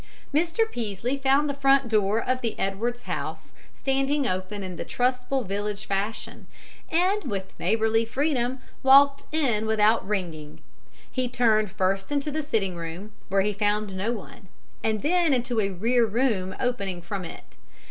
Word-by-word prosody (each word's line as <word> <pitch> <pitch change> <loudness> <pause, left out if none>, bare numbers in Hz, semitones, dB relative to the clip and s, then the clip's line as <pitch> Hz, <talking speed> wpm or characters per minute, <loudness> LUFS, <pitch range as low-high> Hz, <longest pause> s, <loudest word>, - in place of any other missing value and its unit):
Mr. 330 +7 +2
Peaslee 235 - -3
found 275 +2 +3
the 285 - -1
front 275 -1 +3
door 215 -1 +2
of 255 0 +1
the 230 -2 -2
Edwards 230 +5 -2
house - - -5 0.2
standing 275 +1 0
open 185 +2 -3
in 185 -1 -6
the - - -4
trustful 250 +1 0
village 205 +1 -3
fashion, 200 +3 -3 0.4
and, 370 +4 +2
with 195 -6 -4
neighborly 220 +4 +2
freedom, 260 0 0 0.2
walked 275 +1 +6
in 245 -9 +1
without 220 +1 +3
ringing. 165 -7 -4 0.5
He 255 -2 -1
turned 220 -4 +2
first 195 +2 0
into 290 +1 0
the 310 +2 -1
sitting 215 - -1
room, 170 +5 -6 0.2
where 195 +1 +3
he 210 +2 0
found 205 -1 0
no 200 +5 -1
one, 205 -3 -8 0.4
and 220 +1 0
then 335 -2 +3
into 245 -2 -1
a 200 - 0
rear 230 +6 +2
room 210 -5 0
opening 200 -8 -2
from 190 +2 -4
it. 165 - -8
225 Hz, 155 wpm, -26 LUFS, 195-270 Hz, 0.5 s, walked